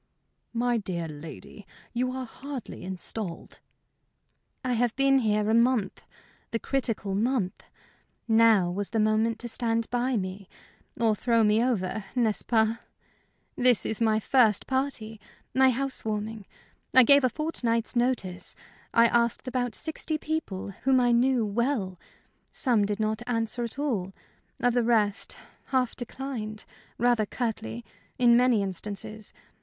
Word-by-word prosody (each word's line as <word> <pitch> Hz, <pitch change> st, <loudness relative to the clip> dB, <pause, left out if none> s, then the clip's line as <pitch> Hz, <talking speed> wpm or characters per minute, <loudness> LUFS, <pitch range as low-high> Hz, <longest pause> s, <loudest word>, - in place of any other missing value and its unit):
"My 240 Hz, 0 st, +1 dB
dear 175 Hz, -4 st, -4 dB
lady, 160 Hz, +6 st, -10 dB, 0.3 s
you 250 Hz, +1 st, 0 dB
are 260 Hz, 0 st, -4 dB
hardly 265 Hz, +1 st, -8 dB
installed." 185 Hz, 0 st, -5 dB, 1.1 s
"I 250 Hz, -, +1 dB
have 240 Hz, 0 st, +1 dB
been 275 Hz, 0 st, +4 dB
here 210 Hz, -3 st, +1 dB
a 220 Hz, -, +2 dB
month 235 Hz, -4 st, +2 dB, 0.5 s
the 230 Hz, -, -1 dB
critical 230 Hz, -6 st, -2 dB
month. 215 Hz, -2 st, 0 dB, 0.7 s
Now 220 Hz, -5 st, +5 dB
was 200 Hz, +2 st, -3 dB
the 225 Hz, -, -1 dB
moment 215 Hz, +1 st, +2 dB
to 240 Hz, -, -5 dB
stand 230 Hz, -1 st, 0 dB
by 245 Hz, 0 st, +1 dB
me, 190 Hz, 0 st, -5 dB, 0.5 s
or 225 Hz, -2 st, +3 dB
throw 230 Hz, +1 st, +2 dB
me 215 Hz, +2 st, +3 dB
over 220 Hz, -4 st, -1 dB
n'est 225 Hz, -4 st, +1 dB
ce -, -, +3 dB
pas? 225 Hz, -1 st, +2 dB, 0.8 s
This 250 Hz, -3 st, +3 dB
is 220 Hz, -, -2 dB
my 220 Hz, -1 st, +3 dB
first 220 Hz, -2 st, +3 dB
party, 250 Hz, -5 st, -2 dB, 0.3 s
my 265 Hz, 0 st, +5 dB
house 270 Hz, +2 st, -1 dB
warming. 215 Hz, -1 st, -4 dB, 0.5 s
I 260 Hz, -, +10 dB
gave 280 Hz, +3 st, +6 dB
a 255 Hz, -, +4 dB
fortnight's 240 Hz, -6 st, -1 dB
notice; 240 Hz, -7 st, 0 dB, 0.4 s
I 230 Hz, 0 st, +7 dB
asked 235 Hz, +2 st, +1 dB
about 245 Hz, -2 st, -1 dB
sixty 315 Hz, 0 st, -3 dB
people, 300 Hz, -13 st, -4 dB
whom 265 Hz, 0 st, +4 dB
I 245 Hz, -1 st, +3 dB
knew 240 Hz, 0 st, +3 dB
well. 210 Hz, -4 st, -1 dB, 0.5 s
Some 235 Hz, -6 st, +2 dB
did 205 Hz, +1 st, -2 dB
not 215 Hz, +1 st, 0 dB
answer 230 Hz, 0 st, -1 dB
at 235 Hz, +2 st, -2 dB
all. 220 Hz, -11 st, -2 dB, 0.5 s
Of 245 Hz, -1 st, +2 dB
the 245 Hz, -, +3 dB
rest, 220 Hz, -4 st, +1 dB, 0.3 s
half 255 Hz, -3 st, 0 dB
declined 240 Hz, -4 st, -5 dB, 0.3 s
rather 240 Hz, -2 st, +2 dB
curtly, 120 Hz, -, -4 dB, 0.3 s
in 240 Hz, -1 st, +5 dB
many 245 Hz, -4 st, +4 dB
instances. 205 Hz, +3 st, -6 dB
230 Hz, 140 wpm, -27 LUFS, 210-250 Hz, 1.1 s, I